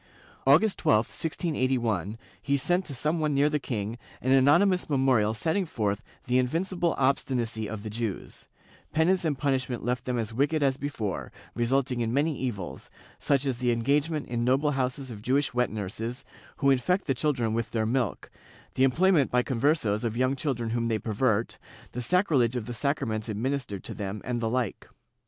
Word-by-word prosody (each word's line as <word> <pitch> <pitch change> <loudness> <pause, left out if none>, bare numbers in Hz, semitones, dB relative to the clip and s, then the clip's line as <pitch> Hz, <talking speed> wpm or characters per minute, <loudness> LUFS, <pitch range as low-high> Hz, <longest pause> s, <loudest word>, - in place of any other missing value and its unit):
August 170 +10 +5
12, 110 +1 +3
1681, 130 - -1 0.2
he 140 0 +1
sent, 175 +7 +1
to 140 - -5
some 155 +6 0
one 150 -2 0
near 145 +2 +3
the 150 - +1
king, 115 -3 -4 0.2
an 130 - 0
anony 140 +8 +6
mous 185 -3 0
memorial 130 -6 +2
setting 160 - 0
forth 105 - -2 0.2
the 125 +1 +2
invincible 170 +6 0
obstinacy 120 -5 0
of 105 -1 -6
the 110 - -5
Jews; 110 -3 -5 0.5
penance 175 +4 +3
and 150 -4 0
punishment 130 -4 -1
left 125 0 -1
them 125 -1 -1
as 110 -1 -3
wicked 145 +5 +1
as 135 -1 +3
before, 135 -8 -4 0.2
resulting 125 +1 0
in 115 -1 0
many 145 +4 +1
evils, 115 -9 -5 0.3
such 140 -1 +1
as 130 -3 -1
the 125 -1 +2
engagement 145 +6 0
in 120 -1 -2
noble 135 +4 +2
houses 130 -1 -2
of 105 -3 -8
Jewish 135 +4 +1
wet 125 -1 +1
nurses, 115 +5 -5 0.3
who 140 -1 +3
infect 180 +9 +1
the 135 - +1
children 125 -4 0
with 115 0 -1
their 110 -2 0
milk, 120 -2 -1 0.4
the 130 - +2
employment 155 +2 +4
by 125 0 +2
Conversos 125 -5 +1
of 115 -1 -2
young 130 +2 +2
children 125 -5 -2
whom 115 0 0
they 115 -1 +1
pervert, 110 +1 0 0.3
the 125 - -4
sacrilege 135 - +2
of 120 -3 -2
the 120 - -5
sacraments 120 -4 -1
administered 115 -2 -2
to - - -6
them, 100 +1 -4
and 120 -1 -2
the 115 - 0
like. 125 -3 -2
130 Hz, 180 wpm, -27 LUFS, 115-145 Hz, 0.5 s, anony